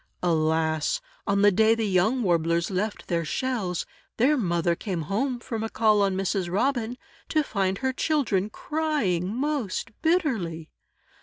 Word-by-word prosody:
Alas! 160 - +1 0.3
On 200 0 +2
the 205 - +7
day 220 +3 +4
the 225 -1 -1
young 210 +6 +2
Warblers 170 -1 +1
left 200 +3 -2
their 170 -2 0
shells, 200 - -2 0.3
their 270 +6 +4
mother 175 - +1
came 175 -3 -3
home 240 - -1
from 225 -2 -4
a 225 - -2
call 215 -2 +3
on 195 -1 +1
Mrs. 190 -1 -1
Robin, 240 +3 0 0.3
to 310 -1 +2
find 195 -6 -1
her 260 +2 -1
children 245 - 0
crying 230 - -1
most 260 -4 -2
bitterly. 235 - 0
205 Hz, 145 wpm, -26 LUFS, 175-250 Hz, 0.3 s, the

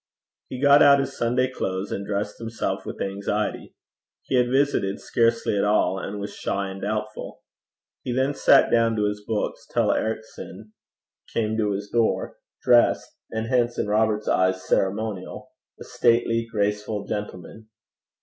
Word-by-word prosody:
He 130 - -6
got 140 +1 +6
out 140 -1 +7
his 135 - -3
Sunday 125 +2 +1
clothes, 95 -6 -4
and 100 - -3
dressed 100 0 -3
himself 115 -4 -4
with - - -6
anxiety: 100 +2 -3 0.5
he - - -6
had 125 -1 +3
visited 130 -7 +1
scarcely 115 -2 +1
at 100 - +1
all, 105 -2 +2
and 100 +2 -5
was 100 - -6
shy 100 0 -3
and 95 0 -9
doubtful. 105 +1 -4 0.6
He 125 - -4
then 130 +3 +1
sat - - +5
down 115 -1 +3
to 105 -1 +1
his 105 0 -4
books, 105 -1 -3
till - - +2
Ericson 110 -1 -5 0.6
came 110 -1 -1
to 105 -2 +1
his 100 +1 -4
door 115 -2 0 0.3
dressed, 120 -1 +3
and 110 0 -3
hence 120 0 +1
in - - 0
Robert's 110 0 +1
eyes 95 0 +1
ceremonial 100 0 -2 0.3
a - - -8
stately, 115 -1 +1
graceful 105 0 -1
gentleman. 105 +2 -7
110 Hz, 150 wpm, -24 LUFS, 100-115 Hz, 0.6 s, out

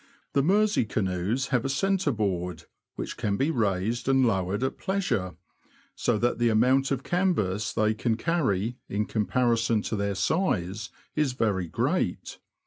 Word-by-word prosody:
The 140 - +3
Mersey 205 +3 +3
canoes 100 +5 -1
have 125 -4 +1
a 135 - -1
centre 190 +3 +1
board, 90 - -2 0.3
which - - -5
can 105 -3 -1
be 140 +4 +1
raised 115 - 0
and 135 -1 +4
lowered 100 0 0
at 130 - -2
pleasure, 125 - -1 0.6
so 120 -3 0
that 120 +2 0
the 120 0 +3
amount 130 +5 +3
of 135 -1 -1
canvas 110 - 0
they 110 -1 +2
can 110 +1 -1
carry, 120 - 0
in 105 +1 -1
comparison 115 +1 +1
to - - -2
their 100 -1 -1
size, 105 - 0 0.3
is 150 -4 +1
very 100 -7 0
great. - - -1
115 Hz, 150 wpm, -27 LUFS, 100-135 Hz, 0.6 s, and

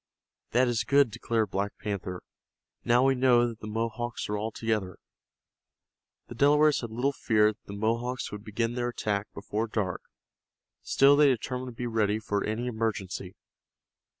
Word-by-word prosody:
"That 125 +2 +3
is 115 -2 0
good," 140 0 +4
declared 110 -1 -1
Black 100 +1 -2
Panther. 95 -4 -4 0.6
"Now 120 +2 +4
we 135 - +4
know 125 -2 +4
that 115 -2 -7
the 110 - -8
Mohawks 115 +2 -3
are 105 - -1
all 105 +2 -2
together." 105 -5 -2 1.3
The - - -8
Delawares 150 +4 +4
had 115 - -5
little 125 +5 0
fear 110 -4 +2
that 105 - -39
the 100 - -8
Mohawks 115 +4 -1
would 105 0 -7
begin 115 +2 -2
their 120 0 -1
attack 105 -3 -2
before 105 +2 -3
dark, 100 -5 -2 0.8
still 140 +1 +5
they 150 0 +6
determined 125 0 -1
to 115 - -9
be - - -1
ready 110 -3 +1
for 105 -2 -2
any 110 +3 -2
emergency. 110 -6 -3
115 Hz, 160 wpm, -28 LUFS, 105-125 Hz, 1.3 s, they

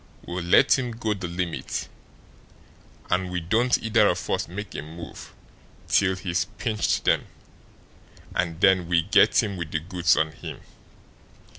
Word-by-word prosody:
We'll 90 +1 -4
let 130 +10 +5
him 125 -2 -3
go 110 -2 -1
the 95 -3 -5
limit, 85 -1 -3 1.2
and 90 0 +1
we 90 0 -2
don't 115 +9 +2
either 110 -1 +4
of 90 -1 -1
us - - 0
make 105 +5 -7
a - - -4
move 80 +2 -10 0.6
till 95 -1 +3
he's 90 -2 -1
pinched 110 -3 -1
them, - - +2 1.1
and 85 -2 -1
then 95 -3 +4
we 85 -1 +2
get - - +4
him 100 -3 -4
with 85 -3 -5
the 80 - -1
goods 85 0 +1
on 80 0 +1
him. - - -9
90 Hz, 150 wpm, -25 LUFS, 85-105 Hz, 1.2 s, let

